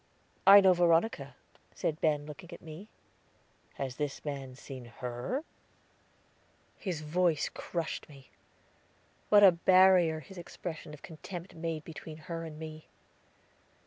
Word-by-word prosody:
"I 200 +1 +11
know 190 -1 +6
Veronica," 170 - +2 0.4
said 155 0 -2
Ben, 150 -2 +1
looking 170 +4 -10
at - - -10
me. 165 +6 -10 0.9
"Has 130 -2 -4
this 145 -1 -4
man 135 -3 -5
seen 130 -2 -9
her?" 120 - -4 1.4
His 175 -6 -3
voice 165 0 +1
crushed 170 -2 -4
me. 135 -3 -15 1.0
What 205 -1 +7
a 195 - +10
barrier 180 -2 +5
his 190 +3 -11
expression 170 -2 -7
of 145 - -20
contempt 170 +2 -8
made 165 -2 -4
between 155 0 -9
her 165 +1 -6
and 155 -2 -8
me! 155 0 -9
160 Hz, 125 wpm, -31 LUFS, 150-180 Hz, 1.4 s, I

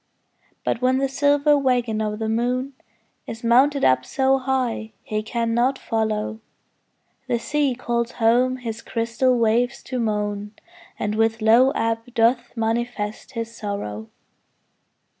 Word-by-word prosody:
But 230 - -1
when 255 +1 +3
the 270 +1 +1
silver 285 +2 +3
waggon 245 -5 +1
of 210 -1 -2
the 220 0 -3
moon 250 +4 -1 0.5
Is 225 +1 -7
mounted 270 +5 +4
up 130 0 +4
so 270 - +1
high 255 -4 -2
he 215 0 -2
cannot 235 +3 0
follow, 220 -2 -2 0.9
The 245 -2 +1
sea 285 +2 0
calls 235 -1 -2
home 245 +3 +2
his 230 -2 -6
crystal 235 +3 0
waves 235 +2 +1
to 255 -1 -4
moan, 210 -2 -2 0.4
And 210 - -2
with 225 +1 +1
low 230 +4 +5
ebb 230 +1 -2
doth 240 +1 +2
manifest 225 +1 -2
his 230 -1 -5
sorrow. 110 - -5
235 Hz, 130 wpm, -23 LUFS, 220-255 Hz, 0.9 s, low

